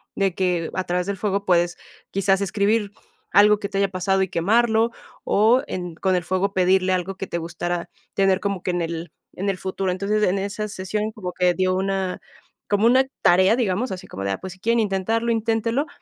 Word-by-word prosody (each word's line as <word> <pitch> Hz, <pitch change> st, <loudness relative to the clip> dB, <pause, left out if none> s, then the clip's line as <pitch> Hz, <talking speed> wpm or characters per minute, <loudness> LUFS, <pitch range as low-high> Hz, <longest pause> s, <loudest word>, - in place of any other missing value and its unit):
de 195 Hz, -2 st, +1 dB
que 180 Hz, -3 st, 0 dB
a 185 Hz, -, 0 dB
través 180 Hz, +1 st, -1 dB
del 200 Hz, -1 st, -2 dB
fuego 200 Hz, 0 st, -1 dB
puedes 175 Hz, -1 st, +2 dB, 0.3 s
quizás 195 Hz, 0 st, +2 dB
escribir 200 Hz, +2 st, +1 dB, 0.4 s
algo 210 Hz, +1 st, +6 dB
que 200 Hz, -, -3 dB
te 200 Hz, -, -3 dB
haya 200 Hz, 0 st, +2 dB
pasado 190 Hz, +1 st, 0 dB
y 190 Hz, -, -3 dB
quemarlo, 220 Hz, +6 st, +2 dB, 0.3 s
o 225 Hz, +5 st, +4 dB
en 180 Hz, -2 st, -5 dB
con 185 Hz, +2 st, +1 dB
el 180 Hz, -, 0 dB
fuego 190 Hz, +3 st, -1 dB
pedirle 185 Hz, 0 st, +3 dB
algo 185 Hz, +1 st, -2 dB
que 195 Hz, -, -5 dB
te 170 Hz, -, -3 dB
gustara 170 Hz, +1 st, -4 dB, 0.3 s
tener 195 Hz, -1 st, +3 dB
como 195 Hz, -2 st, -2 dB
que 180 Hz, -, 0 dB
en 175 Hz, -1 st, -1 dB
el 165 Hz, 0 st, -4 dB, 0.2 s
en 200 Hz, +2 st, -2 dB
el 195 Hz, -, -1 dB
futuro. 190 Hz, 0 st, -2 dB
Entonces, 200 Hz, +3 st, 0 dB
en 195 Hz, 0 st, +2 dB
en 195 Hz, -, -2 dB
esa 210 Hz, +1 st, -4 dB
sesión 210 Hz, +2 st, -3 dB
como 180 Hz, -5 st, -6 dB
que 180 Hz, -1 st, +2 dB
dio 185 Hz, 0 st, +1 dB
una 190 Hz, -1 st, -1 dB, 0.5 s
como 205 Hz, +1 st, +2 dB
una 260 Hz, +2 st, +5 dB, 0.2 s
tarea, 185 Hz, +4 st, +5 dB
digamos, 230 Hz, +1 st, 0 dB
así 185 Hz, -1 st, -6 dB
como 95 Hz, -, -7 dB
de, 100 Hz, -, 0 dB
ah, -, -, -1 dB
pues, 190 Hz, -1 st, -6 dB
si 190 Hz, -, -19 dB
quieren 230 Hz, +4 st, +1 dB
intentarlo, 220 Hz, +3 st, 0 dB
inténtelo. 230 Hz, +5 st, 0 dB
195 Hz, 210 wpm, -23 LUFS, 180-210 Hz, 0.5 s, algo